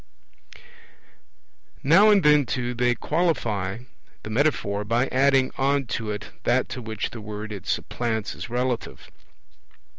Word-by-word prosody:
Now 175 +10 +6
and 205 -3 +5
then, 150 -3 +5
too, 125 0 -2
they 120 0 +1
qualify 120 - -1 0.4
the 110 - -7
metaphor 110 -6 0
by 115 +4 +1
adding 135 0 +3
on 140 0 +2
to 110 -2 -3
it 105 0 -5
that - - +1
to 125 - -5
which 110 -2 -4
the 115 - -8
word 105 +1 -6
it 100 -4 -8
supplants 115 -2 -2
is - - -8
relative. 125 0 -3
120 Hz, 130 wpm, -24 LUFS, 110-140 Hz, 0.4 s, Now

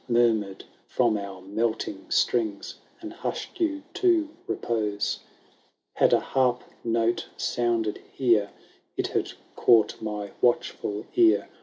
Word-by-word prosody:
Murmured 110 -5 +2 0.2
from 120 -3 +2
our 100 -2 -5
melting 110 +4 -2
strings, 110 -5 +1 0.3
And 325 0 -7
hushed 370 - -5
you 305 -4 0
to 350 -5 +3 0.2
repose. 105 -3 -1 0.7
Had - - +3
a - - +5
harp 125 -2 +1 0.2
note 115 0 +1
sounded 115 -3 0
here. 115 -6 +2 0.5
It - - -1
had - - -1 0.2
caught 115 -3 +4
my 105 -2 -4
watchful 110 -3 0
ear. 350 -1 +4
115 Hz, 115 wpm, -26 LUFS, 105-125 Hz, 0.7 s, a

